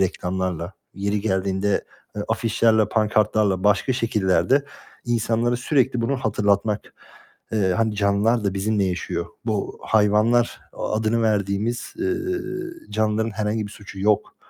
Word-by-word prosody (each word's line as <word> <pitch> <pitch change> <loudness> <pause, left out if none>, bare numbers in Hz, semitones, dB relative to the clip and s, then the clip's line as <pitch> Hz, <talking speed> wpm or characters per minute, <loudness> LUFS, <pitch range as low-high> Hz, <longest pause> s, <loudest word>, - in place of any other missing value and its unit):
reklamlarla, 90 -1 -2 0.2
yeri 100 +1 -1
geldiğinde, 95 0 0 0.3
eee, 105 - -2
afişlerle, 110 -1 +2
pankartlarla 105 -3 +2
başka 105 +5 +3
şekillerde 115 +3 +2 0.4
insanlara 120 0 +1
sürekli 130 -2 +1
bunu 135 +4 0
hatırlatmak. 105 -3 0 0.6
Eee, 100 -4 +2
hani 110 -1 +1
canlılar 105 +3 +2
da 100 -1 0
bizimle 100 +1 +1
yaşıyor. 90 -2 -2 0.2
Bu 105 -3 -2
hayvanlar 110 +3 +3
adını 110 +2 0
verdiğimiz, 105 +2 -1
eee, 365 +1 0 0.8
canlıların 110 +1 0
herhangi 105 +1 -2
bir 100 - -10
suçu 100 -2 -10
yok 105 +1 +1
105 Hz, 115 wpm, -23 LUFS, 100-115 Hz, 0.8 s, başka